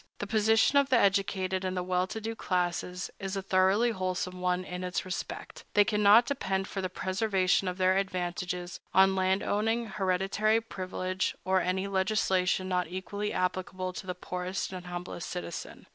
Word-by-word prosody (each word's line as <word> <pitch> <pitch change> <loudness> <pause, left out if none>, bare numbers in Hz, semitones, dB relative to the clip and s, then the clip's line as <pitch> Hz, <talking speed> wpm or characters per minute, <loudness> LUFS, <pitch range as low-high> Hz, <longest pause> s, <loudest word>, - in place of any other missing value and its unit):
The - - -4
position 220 +6 +4
of 280 -1 +1
the 255 - +5
educated 195 -2 +1
and 185 0 -2
well 180 0 +1
to 220 - -5
do 225 +1 -4
classes 180 -1 -2
is 195 0 -4
a - - -1
thoroughly 195 +5 +3
wholesome 185 -2 -3
one 180 0 +1
in 180 0 -6
this 180 0 -2
respect: 185 - -6
they 205 0 +6
cannot 210 +2 +6
depend 195 -8 -1
for 195 - -4
the 185 - -2
preservation 190 0 +1
of 180 0 -2
their 185 0 +3
advantages 180 -2 -2 0.2
on 190 0 +6
land 190 +1 +1
owning, 225 +3 0
hereditary 195 +2 +1
privilege, 185 -3 -3
or 190 0 +3
any 185 +1 0
legislation 190 -1 +1
not 180 -2 0
equally 200 +4 -4
applicable 185 0 -2
to 190 - -7
the 180 - -3
poorest 180 +1 -4
and 180 -1 -7
humblest 175 -1 -6
citizen. 175 -2 -6
190 Hz, 165 wpm, -29 LUFS, 180-200 Hz, 0.2 s, they